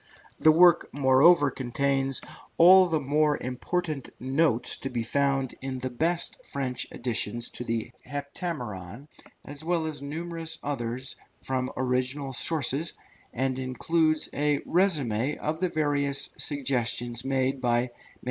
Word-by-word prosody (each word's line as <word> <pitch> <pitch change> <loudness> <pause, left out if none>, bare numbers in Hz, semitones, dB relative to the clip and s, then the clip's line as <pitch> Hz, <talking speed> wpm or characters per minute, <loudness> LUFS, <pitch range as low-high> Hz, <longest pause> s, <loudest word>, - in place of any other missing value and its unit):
The 155 - +7
work 170 +1 +5
moreover 140 +3 +5
contains 135 +1 -1 0.4
all 185 +2 +8
the 160 -2 0
more 150 +2 +2
valuable 150 +4 -3 0.2
notes 130 -2 +1
to 135 - -5
be 120 -3 -2
found 135 +1 0
in 130 0 -4
the 130 0 -4
best 165 +7 -1
French 130 -3 -3
editions 120 -1 -3
of 125 - -6
the 115 -1 -2
Heptameron, 140 - -6 0.4
as 145 +1 -8
well 165 -1 0
as 155 -3 -5
numerous 165 +2 -5
others 130 -2 -3 0.3
from 130 -1 -2
original 130 +2 -1
sources, 155 +2 +2 0.4
and 130 +1 -1
includes 155 +5 +1
a 145 0 +1
résumé 150 - +1
of 155 +1 -3
the 185 0 0
various 145 -3 0
suggestions 120 -4 -1
made 135 0 0
by 120 -1 +2
MM. 125 - -6
140 Hz, 130 wpm, -27 LUFS, 125-155 Hz, 0.4 s, all